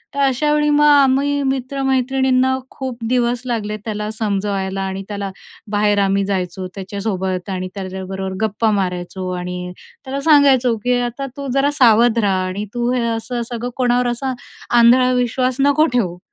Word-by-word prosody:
तर 280 Hz, -, -3 dB
अशा 275 Hz, +2 st, +2 dB
वेळी 295 Hz, 0 st, +2 dB
मग 295 Hz, 0 st, +4 dB
आम्ही 285 Hz, 0 st, +4 dB
मित्र-मैत्रिणींना 265 Hz, -1 st, +1 dB
खूप 260 Hz, -3 st, -6 dB
दिवस 245 Hz, -1 st, +1 dB
लागले 215 Hz, -3 st, -2 dB
त्याला 210 Hz, -1 st, -3 dB
समजवायला 195 Hz, -2 st, -2 dB
आणि 190 Hz, 0 st, -3 dB
त्याला 200 Hz, -1 st, -4 dB, 0.4 s
बाहेर 205 Hz, 0 st, +2 dB
आम्ही 195 Hz, 0 st, +2 dB
जायचो 185 Hz, -1 st, -3 dB
त्याच्यासोबत 190 Hz, -1 st, -3 dB
आणि 185 Hz, -1 st, -3 dB
त्याच्याबरोबर 190 Hz, 0 st, -5 dB
गप्पा 215 Hz, +1 st, 0 dB
मारायचो 185 Hz, -1 st, -2 dB
आणि 180 Hz, 0 st, -5 dB, 0.3 s
त्याला 270 Hz, +1 st, -3 dB
सांगायचो 275 Hz, -5 st, +4 dB
की 250 Hz, 0 st, +2 dB
आता 245 Hz, +3 st, -3 dB
तू 280 Hz, -1 st, -5 dB
जरा 275 Hz, +2 st, +2 dB
सावध 235 Hz, -1 st, +5 dB
राहा 190 Hz, -3 st, +1 dB
आणि 200 Hz, +3 st, -4 dB
तू 240 Hz, 0 st, 0 dB
हे 250 Hz, -, 0 dB
असं 240 Hz, +2 st, -4 dB
सगळं, 240 Hz, +1 st, -4 dB
कोणावर 245 Hz, -1 st, +2 dB
असा 255 Hz, +2 st, -2 dB, 0.4 s
आंधळा 250 Hz, +2 st, +6 dB
विश्वास 250 Hz, +1 st, 0 dB
नको 285 Hz, +3 st, +4 dB
ठेवू. 180 Hz, -8 st, 0 dB
235 Hz, 150 wpm, -19 LUFS, 195-260 Hz, 0.4 s, आंधळा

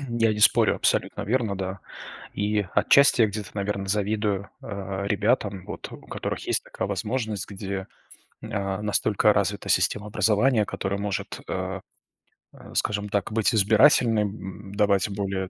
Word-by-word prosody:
я 115 Hz, -2 st, +2 dB
не 105 Hz, -, -4 dB
спорю, -, -, +5 dB
абсолютно -, -, 0 dB
верно, 110 Hz, -3 st, 0 dB
да. 95 Hz, 0 st, -4 dB, 0.5 s
И 105 Hz, 0 st, 0 dB
отчасти 140 Hz, -3 st, +5 dB
я 110 Hz, -, +5 dB
где-то, 105 Hz, -1 st, -6 dB
наверно, 100 Hz, -1 st, -3 dB
завидую, 105 Hz, 0 st, -1 dB
а, 100 Hz, -1 st, -5 dB
ребятам, 105 Hz, -2 st, 0 dB
вот -, -, -7 dB
у -, -, -10 dB
которых -, -, -4 dB
есть -, -, 0 dB
такая -, -, -4 dB
возможность, 105 Hz, +1 st, -3 dB
где, 95 Hz, -1 st, -5 dB, 0.5 s
а, 100 Hz, -3 st, -3 dB
настолько 105 Hz, 0 st, +2 dB
развита 100 Hz, 0 st, -1 dB
система 105 Hz, 0 st, +2 dB
образования, 110 Hz, +2 st, +2 dB
которая 100 Hz, 0 st, -3 dB
может, 100 Hz, -1 st, -4 dB
а, -, -, -3 dB, 0.7 s
э, -, -, -14 dB
скажем 105 Hz, -1 st, -1 dB
так, 100 Hz, -1 st, -1 dB
быть 110 Hz, +2 st, +2 dB
избирательной, 110 Hz, +1 st, +5 dB
м, 100 Hz, -1 st, -7 dB
давать 100 Hz, -1 st, +2 dB
более 95 Hz, -2 st, -3 dB
105 Hz, 145 wpm, -25 LUFS, 100-110 Hz, 0.7 s, спорю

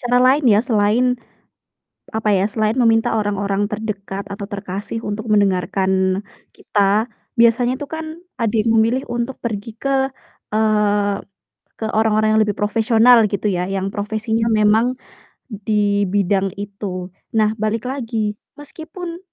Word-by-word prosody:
cara 245 Hz, 0 st, +1 dB
lain 265 Hz, +3 st, +4 dB
ya, 215 Hz, -3 st, +5 dB
selain, 235 Hz, +1 st, +2 dB, 1.0 s
apa 220 Hz, -1 st, -1 dB
ya, 190 Hz, -, +2 dB
selain 215 Hz, +1 st, 0 dB
meminta 225 Hz, -3 st, +3 dB
orang-orang 205 Hz, -1 st, 0 dB
terdekat 200 Hz, -2 st, -5 dB
atau 200 Hz, 0 st, -6 dB
terkasih 200 Hz, +1 st, -5 dB
untuk 215 Hz, 0 st, -4 dB
mendengarkan 190 Hz, -1 st, +1 dB, 0.3 s
kita, 205 Hz, +3 st, +1 dB, 0.3 s
biasanya 240 Hz, +2 st, +4 dB
tuh 290 Hz, -, -5 dB
kan 320 Hz, 0 st, -5 dB, 0.3 s
ada 230 Hz, -4 st, -1 dB
yang 225 Hz, +1 st, +1 dB
memilih 230 Hz, +4 st, +2 dB
untuk 240 Hz, +2 st, -3 dB
pergi 220 Hz, -1 st, -4 dB
ke 270 Hz, -1 st, 0 dB, 0.4 s
eee, 210 Hz, -2 st, +1 dB, 0.5 s
ke 220 Hz, -, -4 dB
orang-orang 215 Hz, 0 st, +2 dB
yang 220 Hz, -, +4 dB
lebih 205 Hz, -2 st, -2 dB
profesional 225 Hz, +3 st, +4 dB
gitu 200 Hz, +1 st, -3 dB
ya, 180 Hz, -2 st, 0 dB
yang 195 Hz, 0 st, -2 dB
profesinya 220 Hz, +2 st, -1 dB
memang 220 Hz, +3 st, +3 dB, 0.5 s
di 205 Hz, -1 st, 0 dB
bidang 195 Hz, 0 st, +1 dB
itu. 195 Hz, -2 st, -6 dB, 0.2 s
Nah, 215 Hz, -1 st, +3 dB
balik 215 Hz, +1 st, -1 dB
lagi, 225 Hz, -5 st, -3 dB, 0.2 s
meskipun 325 Hz, +4 st, -8 dB
215 Hz, 130 wpm, -19 LUFS, 200-235 Hz, 1.0 s, ya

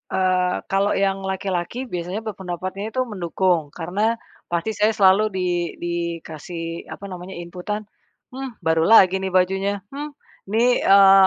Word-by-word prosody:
Eee, 185 Hz, -1 st, +2 dB
kalau 195 Hz, +1 st, +2 dB
yang 195 Hz, 0 st, +1 dB
laki-laki 190 Hz, +4 st, -2 dB
biasanya 180 Hz, +4 st, -3 dB
berpendapatnya 190 Hz, 0 st, -5 dB
itu 255 Hz, -, +2 dB
mendukung. 180 Hz, -, 0 dB
Karena 200 Hz, +7 st, 0 dB, 0.3 s
pasti 170 Hz, +4 st, -1 dB
saya 210 Hz, +2 st, +3 dB
selalu 195 Hz, 0 st, +5 dB
di 185 Hz, -1 st, 0 dB, 0.3 s
dikasih, 170 Hz, -1 st, -4 dB
apa -, -, -11 dB
namanya, 180 Hz, +1 st, -7 dB
inputan. 180 Hz, +5 st, -5 dB, 0.5 s
"Hmm, 265 Hz, -1 st, -6 dB
baru 160 Hz, 0 st, +2 dB
lagi 190 Hz, -4 st, +7 dB
nih 190 Hz, 0 st, -3 dB
bajunya.", 190 Hz, +2 st, +1 dB
"Hmm, 290 Hz, +1 st, -6 dB, 0.4 s
nih", 240 Hz, +3 st, +3 dB
eee, 195 Hz, -1 st, +8 dB
190 Hz, 135 wpm, -22 LUFS, 175-210 Hz, 0.5 s, eee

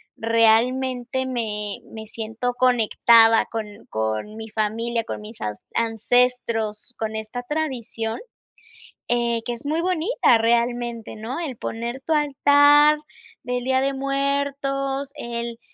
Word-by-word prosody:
realmente 245 Hz, +3 st, +2 dB
me 210 Hz, -5 st, -3 dB
me 220 Hz, -1 st, -9 dB
siento 225 Hz, +3 st, -3 dB
conectada 230 Hz, -2 st, +5 dB
con 225 Hz, -1 st, -4 dB, 0.2 s
con 110 Hz, -, -3 dB
mi 220 Hz, 0 st, -8 dB
familia, 225 Hz, +2 st, -1 dB
con -, -, -5 dB
mis 215 Hz, +2 st, -11 dB
an 105 Hz, 0 st, -2 dB, 0.2 s
ancestros, 230 Hz, -1 st, +1 dB
con 220 Hz, -1 st, -3 dB
esta 220 Hz, +3 st, -5 dB
tradición, 245 Hz, -6 st, -3 dB, 0.9 s
eh, 235 Hz, -1 st, +1 dB
que 240 Hz, -, -2 dB
es 235 Hz, -, -9 dB
muy 310 Hz, +3 st, 0 dB
bonita 365 Hz, -, +2 dB
realmente, 235 Hz, 0 st, 0 dB
¿no? 225 Hz, +7 st, -5 dB
El 305 Hz, -7 st, -4 dB
poner 235 Hz, +4 st, -5 dB
tu 325 Hz, -, +1 dB
altar 290 Hz, 0 st, +5 dB, 0.5 s
del 250 Hz, 0 st, -2 dB
día 260 Hz, +1 st, +2 dB
de 275 Hz, 0 st, 0 dB
muertos 275 Hz, 0 st, -1 dB
el, 235 Hz, -3 st, -5 dB
240 Hz, 120 wpm, -23 LUFS, 225-270 Hz, 0.9 s, conectada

